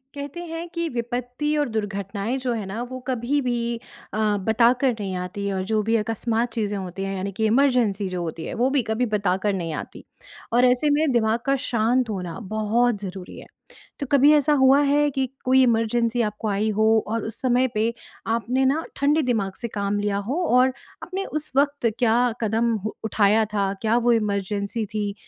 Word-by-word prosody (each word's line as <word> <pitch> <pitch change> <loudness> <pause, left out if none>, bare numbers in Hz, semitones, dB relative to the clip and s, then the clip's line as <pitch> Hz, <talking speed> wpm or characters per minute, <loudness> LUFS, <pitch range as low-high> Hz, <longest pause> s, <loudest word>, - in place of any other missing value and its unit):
कहते 285 +4 -6
हैं 330 +1 -6
कि 335 0 -1
विपत्ति 245 +4 -2
और 290 -3 0
दुर्घटनाएँ 205 +2 -3
जो 245 - +1
है 220 -4 -3
ना 195 +5 -5
वो 255 - -5
कभी-भी 240 -2 -1 0.4
अ, 215 -1 +1
बताकर 235 +6 +3
नहीं 195 -2 -3
आती 185 +3 -4
और 190 -1 -2
जो 215 -1 +2
भी 230 - +3
अकस्मात 225 +2 -1
चीज़ें 210 -3 -2
होती 190 0 -5
हैं 195 0 -3
यानी 190 +1 -3
कि 220 +3 -1
इमरजेंसी 230 -5 +2
जो 180 -1 -3
होती 165 -1 -5
है। - - -5
वो 255 - +4
भी 275 -1 +2
कभी 220 +3 0
बताकर 205 -2 0
नहीं 170 -4 -3
आती - - -7 0.5
और 245 +1 +5
ऐसे 250 +4 +3
में 295 0 +2
दिमाग 225 -1 +2
का 275 0 +3
शांत 235 +2 +1
होना 180 -4 -4 0.2
बहुत 220 +1 +1
ज़रूरी 190 -2 -7
है। - - -11 0.5
तो 280 - -2
कभी 285 +1 +6
ऐसा 300 0 +4
हुआ 265 +2 +6
है 290 +1 +3
कि 265 -1 +1 0.2
कोई 260 +1 +5
इमरजेंसी 230 0 +1
आपको 210 0 -2
आई 205 +2 0
हो 220 - +4 0.2
और 225 0 -2
उस 225 - -6
समय 255 0 +3
पे 220 +2 0 0.3
आपने 235 +4 +1
ना 290 +5 +1
ठंडे 295 +3 +2
दिमाग 215 -7 0
से 235 - -2
काम 205 -1 -2
लिया 205 -1 0
हो। 335 +7 0
और 255 +1 +4 0.3
आपने 385 +1 -4
उस 305 0 -5
वक़्त 285 -4 +2
क्या 230 -2 +3 0.2
कदम 225 +1 +1 0.3
उठाया 215 0 +3
था? 200 -2 0
क्या 225 +1 +2
वो 240 0 +3
इमरजेंसी 205 0 -1
थी? 205 -1 -3
230 Hz, 190 wpm, -23 LUFS, 205-255 Hz, 0.5 s, कभी